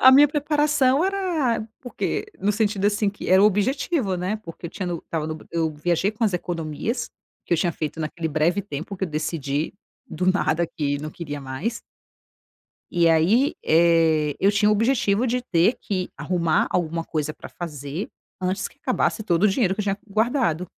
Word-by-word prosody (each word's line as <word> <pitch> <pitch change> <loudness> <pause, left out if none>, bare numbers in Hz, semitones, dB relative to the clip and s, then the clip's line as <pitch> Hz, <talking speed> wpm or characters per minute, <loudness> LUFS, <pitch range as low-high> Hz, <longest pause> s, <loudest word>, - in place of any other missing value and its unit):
A 260 - +9
minha 280 +3 +8
preparação 295 -1 +2
era 340 - 0
porque 245 - -3
no 200 - +1
sentido 205 -2 +1
assim 205 0 +1
que 205 - -7
era 190 +1 +6
o - - +7
objetivo 215 - +1
né 185 +4 -1
porque 165 -1 -8
eu - - -8
tinha 185 -1 -4
eu 175 -1 -2
estava 160 -2 -3
no 155 0 -4
eu 165 -1 0
viajei 170 +5 +1
com 215 +2 -2
as 210 - +2
economias 175 - -3 0.3
que - - -3
eu - - +5
tinha 175 0 +1
feito 155 +1 -4
naquele 160 +1 -3
breve 160 +6 +1
tempo 160 +5 -6
que 190 - -1
eu - - -5
decidi 155 -1 -2 0.3
do 180 +3 -3
nada 170 -3 +1
que 145 -3 -2
não 155 +2 -6
queria 145 -3 -6
mais 140 - -4 1.1
e 170 -1 +4
aí, 185 - +3
eh, 160 -2 +3
eu 200 +1 +3
tinha 210 +1 +3
o - - +5
objetivo 225 0 +2
de 250 +1 0
ter 185 0 +3
que 185 -4 -2
arrumar 170 -3 +1
alguma 165 -1 -1
coisa 155 -2 -2
pra - - -10
fazer 150 +1 -6 0.3
antes 185 +1 -1
que - - -25
acabasse 255 -4 0
todo 175 -2 +1
o - - +7
dinheiro 195 -2 +1
que 210 - -3
eu - - 0
tinha 200 0 -1
guardado. 215 - +1
185 Hz, 190 wpm, -24 LUFS, 160-220 Hz, 1.1 s, A